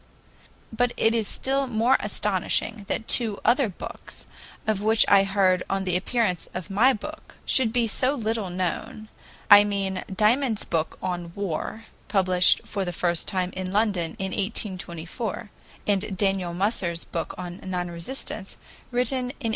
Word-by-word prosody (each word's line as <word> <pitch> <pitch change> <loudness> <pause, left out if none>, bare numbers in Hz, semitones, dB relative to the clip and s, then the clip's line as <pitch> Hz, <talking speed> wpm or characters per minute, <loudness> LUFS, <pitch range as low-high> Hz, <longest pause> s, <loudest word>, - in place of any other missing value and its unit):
But 245 +2 +1
it 225 - +3
is 225 -3 0
still 270 +1 0
more 240 +2 +3
astonishing 210 +1 -1
that 225 - -2
two 220 -5 +3
other 240 +1 +4
books, 185 - -9 0.4
of 215 -3 0
which 220 +1 +4
I 195 -1 +6
heard 190 -2 +3
on 195 0 0
the 180 -2 -1
appearance 185 -2 0
of 185 +2 -5
my 230 +7 +5
book, 300 +7 -7
should 250 -4 +3
be 240 0 +2
so 255 +5 +1
little 220 -5 -2
known, 185 +4 -3 0.4
I 205 0 +11
mean 195 -2 -2
Dymond's 220 +3 +2
book 160 -1 -1
"On 175 -2 -3
War," 200 +3 -4 0.2
published 185 -3 +4
for 200 -2 -2
the 175 - -3
first 175 -1 0
time 185 -1 -1
in 185 0 -4
London 200 -5 0
in 190 0 -3
1824, 190 0 -4 0.3
and 200 -1 0
Daniel 190 -3 0
Musser's 180 -3 -1
book 165 - -4
on 180 0 -6
"Non 180 -2 -3
resistance," 190 +2 -5 0.3
written 250 +2 +1
in 250 - -2
1864. 250 -2 -4
200 Hz, 155 wpm, -25 LUFS, 185-225 Hz, 0.4 s, I